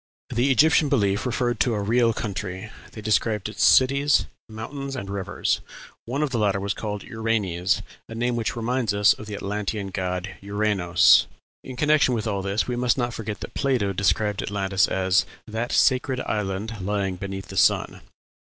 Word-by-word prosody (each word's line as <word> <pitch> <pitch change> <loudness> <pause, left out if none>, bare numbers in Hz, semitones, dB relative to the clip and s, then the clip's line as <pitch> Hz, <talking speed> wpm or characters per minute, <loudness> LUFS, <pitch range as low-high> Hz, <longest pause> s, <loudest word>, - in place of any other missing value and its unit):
The 125 +4 +1
Egyptian 150 +3 +4
belief 105 -4 +1
referred 120 -1 -1
to 120 -4 +2
a - - -1
real 115 +3 +2
country; 100 -1 -5 0.2
they 110 - -8
described 105 -1 0
its 105 - -2
cities, 140 +2 +4 0.2
mountains, 135 +5 -6
and 100 -6 -5
rivers; 100 0 -1 0.4
one 135 +6 -1
of 145 - -1
the 120 - -1
latter 100 -2 +1
was 100 +1 -2
called 105 -2 -5
Uranes, 100 -6 -1 0.3
a 115 - -7
name 120 +1 0
which 115 +1 -2
reminds 115 -2 -1
us 105 0 +5
of 110 - -11
the 105 - -5
Atlantean 100 0 -3
god 90 0 -3
Uranos. 100 -3 +3 0.4
In 130 - -8
connection 150 -2 +3
with 110 - -3
all 100 -3 -1
this 100 +2 -1
we 125 - -2
must 125 +1 +1
not 120 -2 -1
forget 105 -3 -5
that - - -7
Plato 125 -8 0
described 100 +2 +1
Atlantis 100 -1 0
as 95 0 +2 0.2
"that 115 +2 -4
sacred 130 -1 +2
island 105 +2 -3
lying 100 -1 -1
beneath 95 +1 -6
the - - -8
sun." - - +2
105 Hz, 170 wpm, -24 LUFS, 100-120 Hz, 0.4 s, us